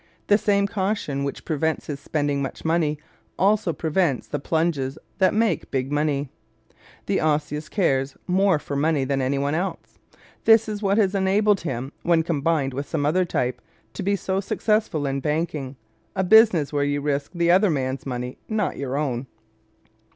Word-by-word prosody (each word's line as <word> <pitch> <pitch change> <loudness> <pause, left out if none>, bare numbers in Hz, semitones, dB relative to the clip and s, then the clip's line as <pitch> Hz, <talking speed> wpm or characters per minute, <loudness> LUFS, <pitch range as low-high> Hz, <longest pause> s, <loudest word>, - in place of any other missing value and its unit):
The 205 - +5
same 200 -1 +2
caution 190 -8 -2
which 140 - -5
prevents 160 0 -1
his 145 -2 -5
spending 145 -1 -1
much 135 +3 -5
money 160 -2 +1 0.4
also 200 -2 +2
prevents 160 -3 0
the - - -3
plunges 155 -3 -1 0.2
that 190 - +4
make 220 +1 0
big 135 +1 -2
money. 145 -2 0 0.4
¶ - - -36 0.3
The 195 - 0
Osseous 150 0 -1
cares 135 -8 0
more 190 -1 +3
for 145 -1 -6
money 150 0 +1
than 135 0 0
any 130 +2 0
one 140 +1 0
else. 180 +4 -4 0.5
This 225 0 +6
is 210 -1 -4
what 200 0 +2
has 200 -3 +3
enabled 200 +1 +2
him, 135 -4 -4
when 170 -1 +3
combined 155 -3 0
with 140 +2 -5
some 145 -3 -1
other 180 +5 +2
type, 125 -6 -2 0.3
to - - -5
be 200 +2 +1
so 190 0 -2
successful 210 -6 0
in 135 0 -1
banking 150 -2 -2 0.4
a 190 - +1
business 190 -7 +5
where 145 -1 +1
you 145 0 0
risk 145 +2 -2
the 170 0 +3
other 190 +3 +5
man's 130 -4 -2
money, 125 -1 -5
not 215 -3 -1
your 135 0 -3
own. 135 -3 -2
155 Hz, 175 wpm, -24 LUFS, 140-190 Hz, 0.5 s, This